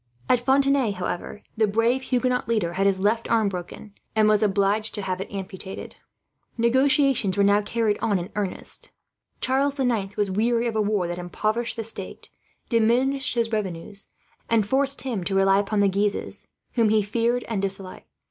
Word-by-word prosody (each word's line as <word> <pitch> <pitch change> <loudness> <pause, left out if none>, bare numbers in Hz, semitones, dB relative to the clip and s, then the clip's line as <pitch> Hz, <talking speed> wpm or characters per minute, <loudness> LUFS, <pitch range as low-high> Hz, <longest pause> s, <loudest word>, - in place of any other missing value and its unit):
At 250 - +4
Fontenay, 270 -2 +2
however, 180 +2 -5
the 220 -1 +2
brave 230 +5 +1
Huguenot 250 -2 0
leader 210 -7 0
had 195 +2 +2
his 195 -1 +2
left 215 +4 0
arm 220 -3 +3
broken, 185 +3 -8 0.2
and 215 -1 +4
was 215 -1 +4
obliged 205 +1 +2
to 205 - -4
have 185 -1 -2
it - - -7
amputated. 190 -1 -7 0.6
Negotiations 260 -3 +2
were 200 - +4
now 200 +1 +5
being 210 - -2
carried 225 -2 0
on 205 -3 +1
in 180 +3 -5
earnest. 200 -3 -4 0.5
Charles 275 +2 +1
the 270 -2 0
Ninth 205 -5 -1
was 205 -2 0
weary 230 +4 +1
of 230 -2 -2
a 215 - +2
war 205 -4 0
that 175 +1 -4
impoverished 215 +7 -2
the 225 - -3
state, 225 - -6 0.4
diminished 250 +4 +2
his 230 -1 0
revenues, 200 -1 -2 0.4
and 225 -3 +3
forced 275 +4 0
him 235 -8 -2
to 195 +2 -2
rely 195 0 +4
upon 205 +1 0
the 200 - +4
Guises, 200 +1 -1 0.2
whom 230 -3 +2
he 215 -1 +3
feared 235 +4 0
and 220 -4 -2
disliked. 195 -1 -3
215 Hz, 180 wpm, -24 LUFS, 195-235 Hz, 0.6 s, now